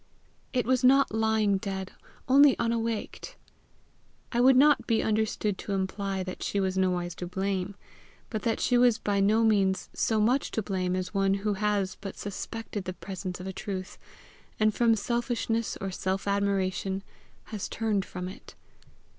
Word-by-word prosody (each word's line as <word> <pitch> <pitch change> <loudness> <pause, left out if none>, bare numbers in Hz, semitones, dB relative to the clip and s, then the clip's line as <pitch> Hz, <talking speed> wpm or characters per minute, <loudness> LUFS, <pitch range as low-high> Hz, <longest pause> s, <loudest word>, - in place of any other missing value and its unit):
It 250 -2 0
was 255 0 +2
not 270 -1 +5
lying 220 -2 +2
dead, 190 -1 -4 0.4
only 275 0 +7
unawaked. 230 - -2 1.0
I 240 - +1
would 260 +1 +6
not 295 +3 +5
be 225 -2 +2
understood 215 -2 0
to 200 - -4
imply 195 0 -2
that 185 0 -7
she 200 - -1
was 190 -1 0
nowise 180 -2 0
to 180 - -5
blame 190 +1 -2 0.6
but 215 -3 -2
that 230 -2 0
she 245 -1 +3
was 245 -2 +5
by 200 -2 0
no 215 +3 +3
means 195 -4 +2
so 220 -1 +1
much 245 +6 +2
to 220 - +1
blame 185 -2 -1
as 185 +1 -3
one 195 -1 +2
who 205 +1 -1
has 200 -1 -1
but 195 -1 -7
suspected 205 0 -5
the 185 - -4
presence 185 -1 -6
of 180 - -7
a 190 - -4
truth, 190 0 -6 0.6
and 215 0 +3
from 230 +1 +3
selfishness 230 0 -1
or 195 -1 -3
self 190 +2 -2
admiration 195 -1 0 0.5
has 210 - -4
turned 215 -4 0
from 180 -1 -6
it. 185 - -11
200 Hz, 165 wpm, -28 LUFS, 190-225 Hz, 1.0 s, only